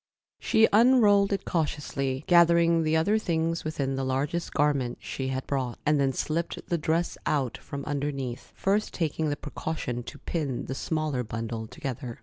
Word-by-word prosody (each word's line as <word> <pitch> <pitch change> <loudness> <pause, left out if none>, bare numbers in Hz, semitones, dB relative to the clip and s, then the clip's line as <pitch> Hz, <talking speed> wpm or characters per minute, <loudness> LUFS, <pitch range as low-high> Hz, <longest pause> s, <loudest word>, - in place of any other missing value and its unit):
She 220 -2 +4
unrolled 210 -4 +5
it 195 -1 -1
cautiously, 145 -4 -1
gathering 170 -1 +5
the 160 0 +2
other 205 +7 +2
things 165 -3 -1
within 140 -4 -2
the 135 - -1
largest 140 +6 -1
garment 140 -5 +1
she 130 - -4
had 130 0 -3
brought, 130 -4 -2
and 150 -1 +3
then 135 -1 +2
slipped 160 +5 -2
the 170 - +1
dress 165 +3 0
out 135 -6 0
from 140 0 -7
underneath, 140 -3 -3
first 205 +2 0
taking 160 -2 -1
the 145 - 0
precaution 145 -5 -4
to - - -9
pin 145 -7 -3
the 130 - -4
smaller 155 -2 -1
bundle 115 0 -4
together. 125 -1 -6
150 Hz, 160 wpm, -27 LUFS, 130-170 Hz, -, unrolled